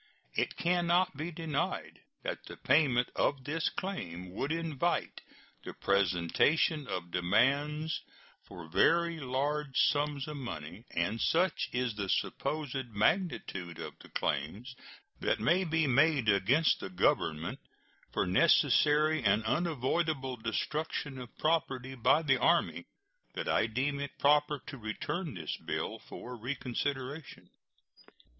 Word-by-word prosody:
It - - -1
can 175 0 +1
not 175 -1 +3
be 155 +4 -4
denied 160 -3 -3 0.2
that - - -4
the - - -9
payment 130 -4 +3
of 140 -2 +1
this 160 +4 -1
claim 90 - -5
would 135 +10 -3
invite 165 -4 -1 0.4
the - - -8
presentation 100 - +2
of 90 -4 -4
demands 140 - +1 0.5
for 85 -2 -10
very 165 - +3
large 140 +1 -2
sums 145 -1 +2
of 150 -1 -5
money; 105 - -7
and 100 +7 -1
such 180 +3 +2
is 125 -2 -1
the 100 -2 -4
supposed 140 0 -1
magnitude 105 - 0
of - - -6
the - - -14
claims 100 - -2 0.4
that - - 0
may 180 +3 +3
be 160 -2 +1
made 140 -2 +3
against 120 - +3
the - - -6
Government 80 -3 0 0.5
for - - 0
necessary 155 0 +4
and 105 +1 +3
unavoidable 150 0 0
destruction 135 +4 -3
of 125 -1 -10
property 135 -5 0
by 130 +6 +3
the 135 -3 +3
Army 170 +4 +2 0.5
that - - -3
I - - +2
deem 135 +5 -1
it 140 -1 -5
proper 150 +1 +3
to 135 - -8
return 125 - -4
this 80 -4 -4
bill - - -4
for 125 +1 -9
reconsideration. 135 +3 -4
135 Hz, 125 wpm, -31 LUFS, 110-155 Hz, 0.5 s, necessary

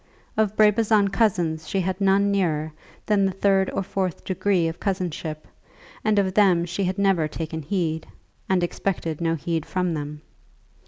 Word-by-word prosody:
Of 215 -1 +1
Brabazon 215 -1 +4
cousins 175 -7 0
she 195 - 0
had 185 +2 -3
none 200 +1 +3
nearer 160 -6 0 0.3
than 205 -2 +2
the - - -1
third 195 0 +2
or - - -2
fourth 185 -2 -3
degree 185 -2 +1
of 165 +1 -5
cousinship, 175 -5 -3 0.6
and 215 -1 +2
of 190 -2 +2
them 185 -4 +4
she 175 +3 -3
had 185 +2 -2
never 195 -6 +2
taken 160 +1 -5
heed, 160 -1 -2 0.4
and 185 -2 +2
expected 170 -3 -2
no 165 -1 +1
heed 165 +1 -2
from 180 0 -1
them. 150 0 -5
185 Hz, 160 wpm, -24 LUFS, 165-200 Hz, 0.6 s, Brabazon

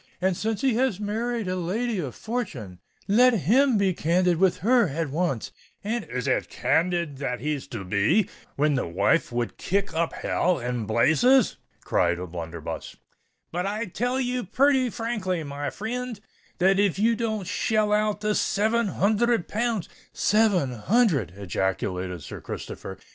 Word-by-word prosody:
And 185 0 +1
since 220 +4 -2
he 265 -3 +2
has 250 -6 +1
married 225 +1 -2
a 185 - -1
lady 205 +5 -1
of 140 -7 -4
fortune, 145 - -5 0.3
let 245 +4 +5
him 250 - +4
be 195 -2 +2
candid 175 +1 +2
with 190 +1 +3
her 240 -3 +5
at 150 0 -3
once; 155 -7 -1 0.3
and——" 225 +2 -2
"Is 125 -1 -4
it - - 0
candid 170 -4 0
that 125 -3 -2
he's 150 0 -3
to 115 -6 -6
be, 100 - +2 0.3
when 150 +1 +2
the 130 - -1
wife 90 - +1
would 120 -1 -2
kick 200 0 -1
up 165 +1 0
hell 180 -1 0
and 120 -2 -3
blazes?" 160 - +4 0.3
cried 85 - +1
O'Blunderbuss. 85 -2 -6 0.6
"But 180 +3 -2
I 215 +3 -2
tell 245 +7 -1
you 250 -1 -1
purty 265 +5 +3
frankly, 205 -7 -2
my 145 0 -4
frind, 235 +1 -4 0.4
that 190 +2 +3
if 200 -3 +2
ye 225 +3 +3
don't 220 -4 -2
shell 210 +2 +1
out 210 0 +1
the 210 0 +1
seven 220 +3 +1
hunthred 215 +2 +1
pounds——" 225 -5 -1 0.3
"Seven 205 - +2
hundred!" 145 - +2
ejaculated 95 -2 -2
Sir - - -8
Christopher. - - -7
190 Hz, 155 wpm, -25 LUFS, 140-225 Hz, 0.6 s, let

